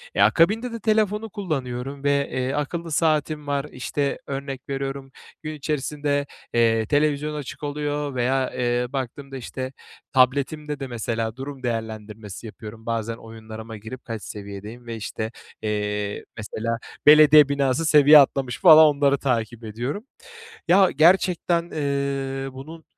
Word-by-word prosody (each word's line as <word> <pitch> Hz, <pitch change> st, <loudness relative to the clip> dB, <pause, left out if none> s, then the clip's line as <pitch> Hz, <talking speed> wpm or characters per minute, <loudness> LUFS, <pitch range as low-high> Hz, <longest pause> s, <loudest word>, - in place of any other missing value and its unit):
Ya, -, -, +6 dB
akabinde 220 Hz, +8 st, +3 dB
de 230 Hz, -, -5 dB
telefonu 215 Hz, 0 st, +1 dB
kullanıyorum 140 Hz, -, -4 dB
ve, 140 Hz, 0 st, +1 dB
eee, 130 Hz, +1 st, -1 dB
akıllı 165 Hz, +3 st, -3 dB
saatim 155 Hz, -1 st, +1 dB
var. 140 Hz, 0 st, -1 dB
İşte, 140 Hz, +2 st, -2 dB
örnek 135 Hz, -1 st, -5 dB
veriyorum, 135 Hz, 0 st, -4 dB, 0.3 s
gün 155 Hz, 0 st, -4 dB
içerisinde, 145 Hz, -1 st, -2 dB, 0.3 s
eee, 115 Hz, -1 st, +3 dB
televizyon 150 Hz, +3 st, +1 dB
açık 145 Hz, 0 st, -7 dB
oluyor 145 Hz, -1 st, -3 dB
veya, 130 Hz, +1 st, +1 dB
eee, 120 Hz, 0 st, 0 dB
baktığımda, 135 Hz, +1 st, -5 dB
işte, 130 Hz, +1 st, -6 dB, 0.4 s
tabletimde 140 Hz, +3 st, +1 dB
de, 135 Hz, -, -4 dB
mesela, 115 Hz, -2 st, -3 dB
durum 135 Hz, 0 st, -8 dB
değerlendirmesi 110 Hz, -3 st, -5 dB
yapıyorum. 110 Hz, 0 st, -10 dB
Bazen 115 Hz, -1 st, -2 dB
oyunlarıma 110 Hz, 0 st, -10 dB
girip 110 Hz, +5 st, -9 dB
kaç 115 Hz, -3 st, -6 dB
seviyedeyim 105 Hz, +4 st, -8 dB
ve, 115 Hz, -, -4 dB
işte, 110 Hz, 0 st, -5 dB, 0.3 s
eee, 105 Hz, -1 st, -2 dB
mesela, 115 Hz, +1 st, -3 dB, 0.3 s
belediye 150 Hz, -1 st, +8 dB
binası 140 Hz, +2 st, +1 dB
seviye 150 Hz, 0 st, +8 dB
atlamış 135 Hz, -2 st, +1 dB
falan 160 Hz, -4 st, +9 dB
onları 140 Hz, 0 st, +3 dB
takip 120 Hz, -3 st, -2 dB
ediyorum. 125 Hz, -, -4 dB, 0.6 s
Ya, 190 Hz, +1 st, +6 dB
gerçekten, 170 Hz, +2 st, +3 dB
ııı, 140 Hz, -2 st, -2 dB
bunun 155 Hz, +5 st, -10 dB
135 Hz, 130 wpm, -24 LUFS, 115-150 Hz, 0.6 s, falan